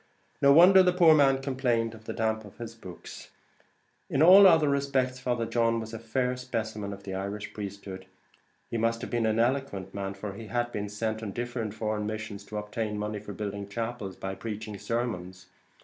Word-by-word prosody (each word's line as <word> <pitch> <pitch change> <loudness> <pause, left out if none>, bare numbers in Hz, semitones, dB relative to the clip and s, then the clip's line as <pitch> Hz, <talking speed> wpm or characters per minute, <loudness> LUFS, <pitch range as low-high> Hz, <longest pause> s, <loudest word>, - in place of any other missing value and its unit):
No 140 - +6
wonder 180 +6 +8
the 180 -1 +3
poor 170 -3 +6
man 135 -3 +4
complained 125 -4 0
the 110 0 -8
damp 110 -1 -1
got 105 -3 -13
to 120 - -6
his 115 0 -8
books. 95 -6 -11 0.8
In 140 - +2
all 190 +3 +10
other 160 -4 +5
respects 135 -2 0
Father 120 -2 -1
John 115 0 +1
was 110 0 -7
a 115 - -5
fair 125 +3 -1
specimen 110 -5 -4
of 100 0 -9
the 95 -1 -6
Irish 100 +2 -5
priesthood. 100 -2 -7 0.6
He 115 - -1
must 115 +1 0
have - - -6
been 120 -2 +1
an 110 0 +1
eloquent 115 -6 -1
man, 100 -1 -4
for 100 0 -6
he 110 +2 -9
had 120 +1 -1
been 105 -2 -4
sent 110 +1 -3
on 105 -3 -5
different 120 -2 -4
foreign 110 -1 -2
missions 105 -2 -5
to 105 - -6
obtain 105 0 -3
money 105 0 -3
for 105 0 -8
building 100 0 -5
chapels 115 -2 -4
by 95 0 -5
preaching 110 0 -6
sermons. 95 -7 -3
110 Hz, 195 wpm, -28 LUFS, 105-125 Hz, 0.8 s, all